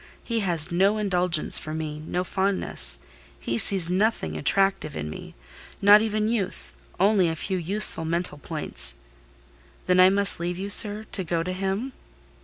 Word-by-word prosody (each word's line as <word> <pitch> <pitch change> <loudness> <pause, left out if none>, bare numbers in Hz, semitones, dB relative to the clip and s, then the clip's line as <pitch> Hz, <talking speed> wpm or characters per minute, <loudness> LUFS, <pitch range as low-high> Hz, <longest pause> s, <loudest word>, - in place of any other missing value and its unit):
He 230 -1 -2
has 175 -4 0
no 195 +5 +2
indulgence 180 -5 +1
for 155 0 -7
me—no 155 +3 -4
fondness. 190 +1 +2 0.4
He 115 0 -3
sees 180 - +2
nothing 185 - -1
attractive 195 - 0
in 75 0 -5
me; - - -10 0.4
not 205 +1 +6
even 215 -1 -1
youth—only 190 - -1
a 160 - -3
few 185 +3 -3
useful 195 +1 +2
mental 165 -2 -2
points.—Then - - -5
I 185 0 +7
must 200 -1 +3
leave 175 +1 -3
you, 200 +2 -5
sir, 210 +1 +1
to 190 - 0
go 165 -1 -2
to 185 +2 -4
him?" 195 +7 -3
180 Hz, 145 wpm, -24 LUFS, 155-200 Hz, 0.4 s, I